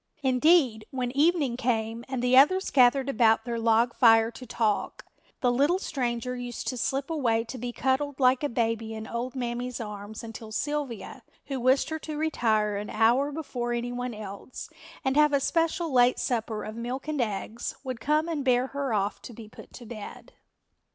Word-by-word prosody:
Indeed, 260 -4 +3
when 250 -2 -3
evening 290 -2 +2
came 230 -2 -1
and 260 -2 -3
the 250 +1 +3
others 370 +9 +5
gathered 260 +1 +4
about 225 -3 +3
their 235 -1 -3
log 230 +1 +3
fire 225 -1 +5
to 255 +2 -11
talk, 220 -2 -1 0.4
the 245 - +3
little 285 +8 +3
stranger 250 - -3
used 245 -1 -6
to 255 - -3
slip 270 +5 -2
away 235 -8 +1
to 250 +2 -8
be 245 +1 -4
cuddled 265 +3 -1
like 255 -1 +4
a 290 - +1
baby 225 -1 -1
in 220 0 -6
old 240 +3 -4
Mammy's 245 0 -3
arms 210 -1 -7
until 225 -1 -9
Sylvia, 285 -3 -4 0.2
who 270 -2 -4
wished 255 +3 +3
her 315 - -2
to 305 -1 -6
retire 220 -9 +1
an 205 +1 -5
hour 250 +6 +3
before 250 -6 -3
any 240 +1 -2
one 245 -1 -4
else 210 +3 -8 0.3
and 265 0 +1
have 300 -1 +5
a 280 - +4
special 330 +3 0
late 245 0 +5
supper 225 -3 -2
of 215 - -7
milk 245 +5 -5
and 300 -3 -1
eggs, 220 +1 -3
would 255 -3 -5
come 305 +4 +1
and 315 -4 -2
bear 250 -1 +3
her 275 -5 -2
off 200 0 -1
to 240 - -10
be 220 -1 -10
put 215 - -14
to 240 - -10
bed. 220 -2 -9
245 Hz, 185 wpm, -27 LUFS, 225-275 Hz, 0.4 s, others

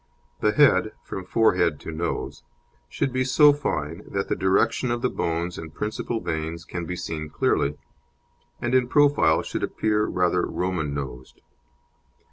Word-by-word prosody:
The 105 - +2
head, 140 -7 +4
from 95 - -6
forehead 90 -9 +2
to - - -6
nose, 85 +2 -3 0.5
should 135 - -2
be 130 0 +1
so 145 +3 +6
fine 80 - -3
that 100 0 -3
the - - +1
direction 95 +6 +1
of 120 0 -2
the 125 - +1
bones 85 +1 -2
and 80 -1 -8
principal 110 +5 -3
veins 80 -2 -4
can 85 -1 -5
be 90 - -3
seen 75 -3 -5
clearly, 75 -1 0 0.8
and 120 +1 -2
in 130 -1 +4
profile 145 - +4
should - - -4
appear 105 -1 0
rather 90 0 +1
Roman 85 -6 -2
nosed. 65 -3 -7
90 Hz, 150 wpm, -24 LUFS, 80-120 Hz, 0.8 s, so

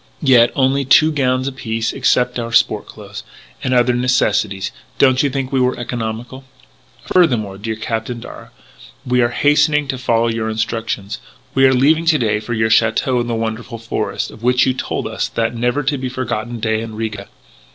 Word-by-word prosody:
Yet 125 -4 +5
only 135 +1 +2
two 155 +4 +5
gowns 130 -3 0
apiece, 115 -4 -3
excepting 125 -2 +1
our 115 - -6
sport - - +2
clothes. - - -10 0.4
And 130 - -1
other 125 0 +3
necessaries. 105 -5 0 0.3
Don't 130 -1 +4
you 145 - +1
think 135 -1 -3
we 135 - +1
were 125 0 +1
economical?" 120 +2 -5 0.7
"Furthermore, 110 - +2
dear 110 +1 -3
Captain 115 +2 -4
Darragh, - - -11 0.6
we 125 0 +2
are 120 - +2
hastening 150 +1 +2
to 130 - -3
follow 115 -2 +1
your 115 -1 -2
instructions. 110 -2 -3 0.3
We 135 0 +4
are 130 - +3
leaving 155 +6 +3
to 160 -2 +5
day 110 -5 0
for 120 +2 -4
your 110 0 +1
château 115 +3 +2
in 120 - -4
the 120 - -1
wonderful 115 +1 -4
forest, 115 0 -3
of - - -14
which 125 +1 +3
you 130 - +1
told 130 - -4
us - - -2
that 115 0 -2
never 120 +5 -1
to 140 0 -1
be 130 -1 -3
forgotten 120 -2 -4
day 110 0 0
in 115 -1 -7
Riga. 105 -3 -5
120 Hz, 185 wpm, -18 LUFS, 110-130 Hz, 0.7 s, Yet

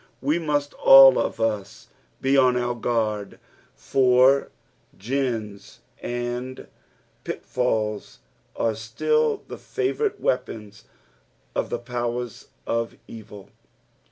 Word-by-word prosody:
We 150 +6 0
must 145 -3 -1
ail 135 -1 +9
of - - -2
us 110 -3 -3 0.3
be 135 +1 +2
on 130 -2 +4
our 120 0 -1
guard, 110 -4 -2 0.4
for 130 +1 +3 0.5
gins 115 -3 -4 0.2
and 120 +1 -4 0.6
pitfalls 110 -4 -2 0.4
arc 110 -2 -1
still 450 - 0
the - - -8
favourite 420 +1 -2
weapons 105 -5 -3 0.7
of - - -2
the - - -2
powers 120 -1 -4 0.2
of 115 0 -2
evil. 105 -3 -12
120 Hz, 100 wpm, -24 LUFS, 110-135 Hz, 0.7 s, ail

